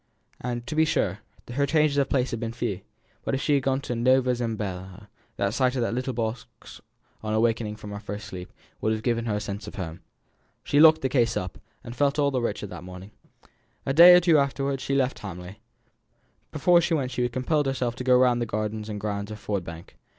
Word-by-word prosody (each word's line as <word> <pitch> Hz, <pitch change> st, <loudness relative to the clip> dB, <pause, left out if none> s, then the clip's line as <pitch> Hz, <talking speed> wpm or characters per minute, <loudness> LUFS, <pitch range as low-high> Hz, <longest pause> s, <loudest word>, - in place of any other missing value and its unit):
To 120 Hz, +3 st, -4 dB
be 160 Hz, -, +4 dB
sure, 160 Hz, -, 0 dB, 0.3 s
her 140 Hz, +2 st, +1 dB
changes 150 Hz, -1 st, +2 dB
of 135 Hz, -, +1 dB
place 130 Hz, -2 st, +1 dB
had 115 Hz, -, -3 dB
been 115 Hz, -1 st, -3 dB
but 115 Hz, -, -10 dB
few; 115 Hz, -6 st, -2 dB, 0.4 s
but -, -, -1 dB
if 135 Hz, -, -2 dB
she 150 Hz, -, +2 dB
had 140 Hz, -, +3 dB
gone 135 Hz, +1 st, 0 dB
to 125 Hz, -, -4 dB
Nova 125 Hz, +2 st, +3 dB
Zembla, 105 Hz, -4 st, -5 dB, 0.3 s
the 100 Hz, 0 st, 0 dB
sight 130 Hz, +3 st, +1 dB
of 125 Hz, -, 0 dB
that 115 Hz, -, -1 dB
little 125 Hz, +1 st, -2 dB
leather 115 Hz, 0 st, -2 dB
box 115 Hz, 0 st, -15 dB, 0.4 s
on 110 Hz, 0 st, -2 dB
awaking 110 Hz, -1 st, +1 dB
from 105 Hz, -1 st, -9 dB
her 100 Hz, -, -5 dB
first 105 Hz, +1 st, -7 dB
sleep, 90 Hz, -3 st, -8 dB, 0.3 s
would 110 Hz, -, +1 dB
have 110 Hz, 0 st, -4 dB
given 115 Hz, -2 st, 0 dB
her 110 Hz, -3 st, -1 dB
a -, -, -1 dB
sense 100 Hz, +1 st, -6 dB
of -, -, -8 dB
home. 90 Hz, -3 st, -6 dB, 0.6 s
She 145 Hz, -, +2 dB
locked 160 Hz, 0 st, +7 dB
the 135 Hz, -, +1 dB
case 120 Hz, -3 st, +1 dB
up 90 Hz, -1 st, -4 dB
again, -, -, -26 dB, 0.2 s
and 120 Hz, -, -8 dB
felt 140 Hz, +2 st, +1 dB
all 140 Hz, -1 st, +2 dB
the 130 Hz, -2 st, 0 dB
richer 115 Hz, -, -2 dB
for 100 Hz, -, -10 dB
that 85 Hz, -2 st, -8 dB
morning. 90 Hz, +2 st, -10 dB, 0.7 s
A 135 Hz, -, 0 dB
day 175 Hz, +4 st, +10 dB
or -, -, +8 dB
two 170 Hz, -3 st, +4 dB
afterwards 140 Hz, -1 st, -1 dB
she 140 Hz, -, -1 dB
left 135 Hz, -1 st, 0 dB
Hamley. 90 Hz, 0 st, -8 dB, 0.9 s
Before 170 Hz, +3 st, +4 dB
she 170 Hz, 0 st, +1 dB
went 130 Hz, -4 st, -2 dB
she 125 Hz, -1 st, 0 dB
compelled 140 Hz, +4 st, 0 dB
herself 130 Hz, -3 st, -1 dB
to 125 Hz, -, -4 dB
go 125 Hz, 0 st, +5 dB
round 125 Hz, -1 st, +3 dB
the 120 Hz, -, -1 dB
gardens 105 Hz, 0 st, -3 dB
and 105 Hz, -1 st, -4 dB
grounds 100 Hz, -1 st, -3 dB
of 110 Hz, -, -6 dB
Ford 100 Hz, -3 st, -3 dB
Bank. 85 Hz, 0 st, -10 dB
120 Hz, 230 wpm, -26 LUFS, 105-135 Hz, 0.9 s, day